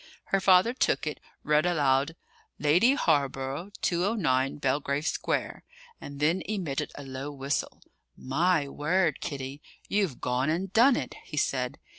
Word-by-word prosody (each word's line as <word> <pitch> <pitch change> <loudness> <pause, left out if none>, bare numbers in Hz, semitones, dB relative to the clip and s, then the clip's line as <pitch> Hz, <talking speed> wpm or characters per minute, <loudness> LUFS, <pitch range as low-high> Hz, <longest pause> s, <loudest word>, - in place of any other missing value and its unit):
Her 195 - +5
father 190 +4 +5
took 255 - +1
it, 150 - -4 0.2
read 150 0 +3
aloud: 145 -3 +2 0.4
"Lady 175 - +4
Hawborough, 140 - 0
209, 170 - +1
Belgrave 140 +1 -1
Square," - - -2 0.4
and 140 0 -8
then 165 +5 +2
emitted 160 -9 -2
a 145 - -8
low 135 +2 -6
whistle. 140 0 -3 0.3
"My 155 +3 +1
word, 155 +2 0
Kitty, 135 0 -5 0.3
you've 195 -10 0
gone 125 +3 0
and 180 +4 -2
done 245 +4 +6
it!" - - -4
he - - -8
said. - - 0
150 Hz, 135 wpm, -28 LUFS, 135-185 Hz, 0.4 s, done